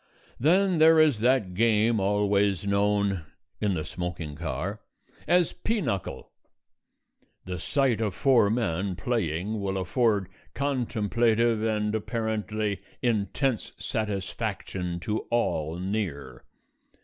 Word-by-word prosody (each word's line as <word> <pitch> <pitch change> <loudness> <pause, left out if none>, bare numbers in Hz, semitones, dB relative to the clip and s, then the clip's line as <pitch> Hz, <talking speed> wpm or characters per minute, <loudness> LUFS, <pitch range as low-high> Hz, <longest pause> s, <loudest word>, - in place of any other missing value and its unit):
Then 180 +5 +3
there 160 0 +7
is 150 -8 +4
that 120 -5 +2
game 110 +2 +3
always 100 -1 +1
known 100 -1 +1 0.4
(in 100 -3 +1
the 80 -2 -3
smoking 85 -3 -5
car) 85 - -4 0.5
as 175 -2 +3
"pea 220 +5 -1
knuckle." 115 - -3 1.1
The 90 -1 -4
sight 135 - +1
of 105 -4 -1
four 115 -1 +4
men 100 -4 -1
playing 100 -1 -2
will 95 -1 -2
afford 100 0 +1 0.3
contemplative 115 -4 +1
and 105 -1 0
apparently 110 -2 -2 0.2
intense 120 +2 0
satisfaction 95 -3 -3
to 105 +4 -1
all 80 -9 0
near. 90 -9 -4
105 Hz, 105 wpm, -27 LUFS, 95-120 Hz, 1.1 s, there